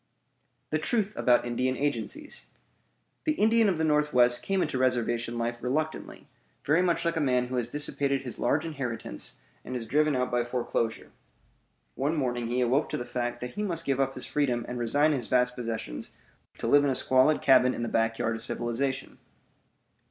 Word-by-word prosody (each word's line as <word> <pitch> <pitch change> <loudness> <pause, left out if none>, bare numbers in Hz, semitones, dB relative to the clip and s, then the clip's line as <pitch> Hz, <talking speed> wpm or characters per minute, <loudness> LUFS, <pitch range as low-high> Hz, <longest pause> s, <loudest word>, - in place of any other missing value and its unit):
THE 155 - +1
TRUTH 215 +4 0
ABOUT 120 -1 +3
INDIAN 125 +2 -1
AGENCIES 145 - -3 0.8
The 310 - +2
Indian 225 -3 +4
of 180 - 0
the 160 - 0
Northwest 150 -6 +3
came 195 -1 0
into 130 - -2
reservation 120 -2 0
life 120 +1 -2
reluctantly, 155 +6 -3 0.4
very 155 +5 +3
much 175 -2 +1
like 170 -1 0
a - - +1
man 125 -3 +2
who 130 - -3
has 120 -2 0
dissipated 140 -1 0
his 125 -3 -7
large 145 +6 +1
inheritance 130 - -4 0.3
and 130 - -6
is 120 -2 -3
driven 150 +4 +2
out 125 0 -1
by 120 0 +1
foreclosure. 120 -2 -2 0.8
One 145 +5 -1
morning 120 -5 -1
he 125 +2 0
awoke 130 +5 +2
to - - -2
the 120 - -5
fact 120 0 -3
that 125 - -5
he 205 - -4
must 170 -5 -2
give 135 -1 0
up 135 0 0
his - - -2
freedom 125 -5 0
and 125 0 -5
resign 145 +6 +2
his 130 -6 -2
vast 125 0 +2
possessions 115 - -5 0.4
to - - -5
live 145 0 +5
in 145 - +2
a 130 - +1
squalid 130 +5 +3
cabin 130 -1 +5
in 120 - -3
the - - -1
backyard 115 0 0
of 115 - -4
civilization. 130 +4 -2
130 Hz, 185 wpm, -28 LUFS, 120-150 Hz, 0.8 s, live